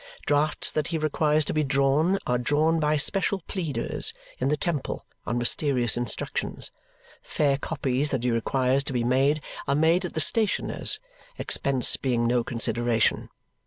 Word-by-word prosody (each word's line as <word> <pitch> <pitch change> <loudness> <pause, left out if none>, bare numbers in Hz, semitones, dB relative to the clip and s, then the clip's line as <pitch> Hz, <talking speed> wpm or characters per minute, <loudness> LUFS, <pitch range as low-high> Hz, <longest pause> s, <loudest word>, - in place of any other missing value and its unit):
Drafts 145 +1 +1
that 150 -1 -1
he 165 - -2
requires 155 0 +1
to - - -1
be 155 - +1
drawn 140 +6 +2
are 125 0 0
drawn 155 +6 +1
by 150 0 +1
special 195 +5 +1
pleaders 165 -4 -3 0.2
in 130 - 0
the 150 +2 +1
temple 155 -3 -3 0.2
on 120 - -1
mysterious 120 -1 +2
instructions; 120 -1 -2 0.5
fair 140 -2 0
copies 135 0 -2
that 130 -4 -2
he 125 - +1
requires 130 +3 +1
to 135 - -3
be 120 -2 0
made 135 +5 +1 0.2
are 140 - +1
made 165 +5 +3
at 180 - -5
the - - 0
stationers', 215 +6 +2 0.4
expense 135 -3 +2
being 120 -3 0
no 120 0 +1
consideration. 115 -1 0
140 Hz, 155 wpm, -25 LUFS, 125-155 Hz, 0.5 s, made